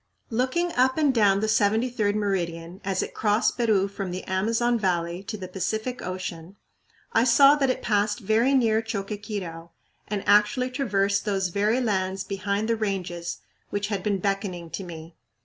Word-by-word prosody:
Looking 260 +10 0
up 260 +2 +2
and 295 -4 +3
down 205 -4 +3
the - - +1
73d 215 0 +1
meridian 180 -3 -2
as 190 -1 0
it - - -7
crossed 215 +2 +1
Peru 215 -5 +2
from 195 -1 -5
the 180 +1 -5
Amazon 230 +5 +1
Valley 175 -3 -1
to 205 +2 -6
the 185 -2 -7
Pacific 220 +7 -3
Ocean, 180 -1 -6 0.6
I 225 - +4
saw 275 +3 +7
that 270 -2 +1
it 255 - -1
passed 205 -1 +1
very 230 +6 +2
near 225 -4 +3
Choqquequirau, 200 -6 -5 0.4
and 205 -1 -3
actually 210 +5 +3
traversed 200 -6 0
those 195 -3 0
very 210 +6 +1
lands 190 -5 -1
"behind 200 +2 -2
the 230 - +2
Ranges" 185 -5 -3 0.3
which 205 +1 -2
had 200 -3 -2
been 200 +1 0
beckoning 190 -3 -3
to 195 - -4
me. 165 -2 -10
205 Hz, 165 wpm, -25 LUFS, 190-225 Hz, 0.6 s, saw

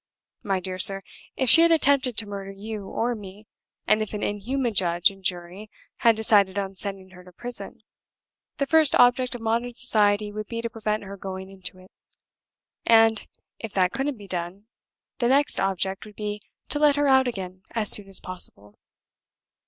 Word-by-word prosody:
My 195 -2 -1
dear 185 0 -6
sir, 195 -1 +7 0.3
if 260 - -1
she 330 - +9
had 335 - +5
attempted 275 -6 +3
to 225 - +5
murder 200 -1 -7
you 200 +1 -8
or 240 +4 -2
me, 205 -1 -11 0.4
and 215 0 +2
if 215 0 -4
an 210 - -5
inhuman 235 +4 -2
judge 175 -1 +2
and 195 -1 -18
jury 180 +3 -4 0.3
had 230 -1 +3
decided 205 -3 +2
on 195 -1 -3
sending 195 -1 -6
her 180 -1 -15
to 180 - -16
a - - -18
prison, 240 +6 -8 0.7
the 280 - 0
first 315 -1 +3
object 245 +1 +3
of 240 - -8
modern 230 +2 -2
society 210 -4 +1
would 215 0 -7
be 230 - -5
to 230 0 -5
prevent 215 -1 -3
her 200 0 -9
going 190 0 -8
into 185 -1 -6
it; 185 0 -18 0.9
and, 225 -1 +3 0.3
if 225 -3 -8
that 185 -2 +1
couldn't 270 -1 -3
be 205 - -12
done, 180 +2 -6 0.5
the 240 - +1
next 280 +3 +3
object 195 0 -2
would 210 - -15
be 210 0 -5 0.3
to 290 - +1
let 295 -1 +4
her 290 0 +1
out 265 -1 +4
again 185 -5 -6
as 215 -3 +6
soon 200 -2 +2
as 195 - -3
possible. 105 - -5
210 Hz, 185 wpm, -24 LUFS, 190-235 Hz, 0.9 s, she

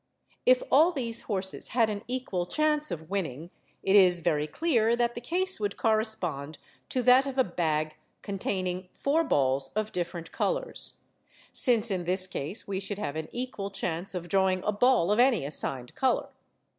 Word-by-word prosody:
If 255 0 +5
all 315 +6 +6
these 235 -7 -3
horses 190 -3 -3
had 230 -2 +5
an 205 -1 -5
equal 240 -9 -2
chance 305 - +2
of 160 +1 -6
winning, 165 -4 -3 0.3
it 195 - +3
is 180 -3 +6
very 150 -2 0
clear 235 - +2
that 240 0 +1
the 240 - -6
case 365 +8 0
would 205 -1 -2
correspond 215 -10 -1 0.3
to 255 - 0
that 255 +3 +6
of 270 -1 -5
a 260 - +5
bag 155 -5 -1 0.3
containing 185 -2 -3
four 305 +4 +1
balls 135 - +1
of 215 0 -1
different 170 -1 -4
colours; - - -2 0.6
since, 235 -4 +3
in 180 -2 -2
this 185 +1 +2
case, 185 +1 -5
we 195 -1 -2
should 195 +1 -4
have 155 -9 -4
an 160 0 -4
equal 245 -5 -4
chance 180 -1 -3
of 175 -1 -4
drawing 190 0 +2
a - - +1
ball 210 -4 +3
of 210 - +2
any 245 - +4
assigned 135 -3 -4
colour. 265 -1 0
200 Hz, 170 wpm, -28 LUFS, 175-245 Hz, 0.6 s, all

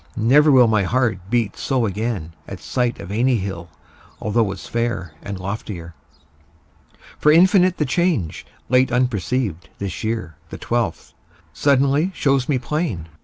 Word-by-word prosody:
Never 140 +8 +5
will 130 -3 +7
My 110 -2 +2
heart 115 -1 0
beat 115 -3 0
so 130 -4 0
again 105 -5 -3
at - - -7
sight 125 -2 -1
Of 85 - -8
any 125 +4 +2
hill 95 -5 -4 0.5
although 110 -1 +1
as 95 - -8
fair 115 -8 -2
And 100 -2 -6
loftier. 95 -3 -6 1.3
For 150 - +5
infinite 180 +2 +5
The 150 - +1
change, 130 - 0 0.2
late 130 0 +3
unperceived, 120 -5 -1
this 100 +2 -5
year, 110 -8 -3
The - - -7
twelfth, 120 -1 -2 0.4
suddenly, 140 - +2
shows 135 -1 +1
me 140 - +2
plain. 130 - -3
120 Hz, 140 wpm, -21 LUFS, 100-130 Hz, 1.3 s, will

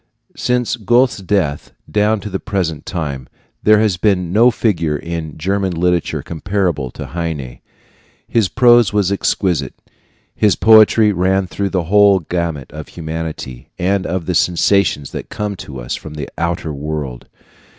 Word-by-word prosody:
Since 125 -1 0
Goethe's 120 +2 +2
death, 95 -7 -1
down 105 0 +1
to 105 - -6
the 95 - -2
present 85 -7 -3
time, 70 -7 -4 0.3
there 105 0 +5
has 105 -5 +1
been 90 -3 +1
no 115 +4 +6
figure 85 -11 0
in 80 -1 -6
German 95 +3 -1
literature 90 0 0
comparable 85 -5 -2
to - - -8
Heine. 80 -7 -5 0.7
His 110 -5 +1
prose 120 -1 +5
was 100 -2 +1
exquisite. 95 -3 0 0.6
His 105 -4 +2
poetry 110 +1 +6
ran 95 +1 +1
through 100 +2 -3
the 95 -3 -1
whole 100 +3 +5
gamut 85 -4 -3
of 75 0 -8
humanity 80 -6 -6
and 95 +2 0
of 85 0 -3
the 90 - -1
sensations 90 -4 +2
that - - -7
come 105 -1 -3
to 70 -7 -8
us - - -5
from 75 -1 -7
the 75 -2 -5
outer 85 -2 -2
world. 70 -3 -5
90 Hz, 150 wpm, -17 LUFS, 80-100 Hz, 0.7 s, no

